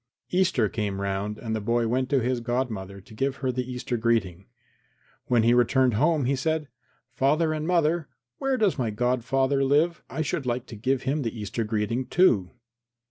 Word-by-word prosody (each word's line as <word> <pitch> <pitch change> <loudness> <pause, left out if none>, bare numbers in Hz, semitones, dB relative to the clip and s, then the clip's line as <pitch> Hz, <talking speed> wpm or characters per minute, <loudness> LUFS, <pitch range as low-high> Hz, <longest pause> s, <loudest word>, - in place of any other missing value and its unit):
Easter 180 - +2
came 100 -2 -3
round 100 +2 -2
and 110 -1 -3
the 110 - -2
boy 115 +2 +1
went 130 +2 0
to 140 -2 +2
his 125 0 0
godmother 115 -6 -3
to 100 - -16
give 135 +5 -1
her 130 -2 -1
the 125 0 -4
Easter 125 -1 -3
greeting. 100 -6 0 0.8
When 120 -3 +3
he 120 +1 +4
returned 125 +1 +3
home 150 +5 +2
he 135 +2 +1
said, 155 +2 -1 0.4
"Father 155 +5 +2
and 155 0 -3
mother, 170 -3 +1 0.3
where 270 -1 0
does 205 - +1
my 120 -3 0
godfather 130 +4 +1
live? 150 +5 +2
I 155 - -2
should 135 -2 -3
like 120 +1 -1
to 115 - -10
give 130 +4 -1
him 140 +3 0
the 115 -2 -4
Easter 105 +3 -3
greeting, 110 +4 -1
too." 115 - +3
125 Hz, 185 wpm, -26 LUFS, 110-140 Hz, 0.8 s, he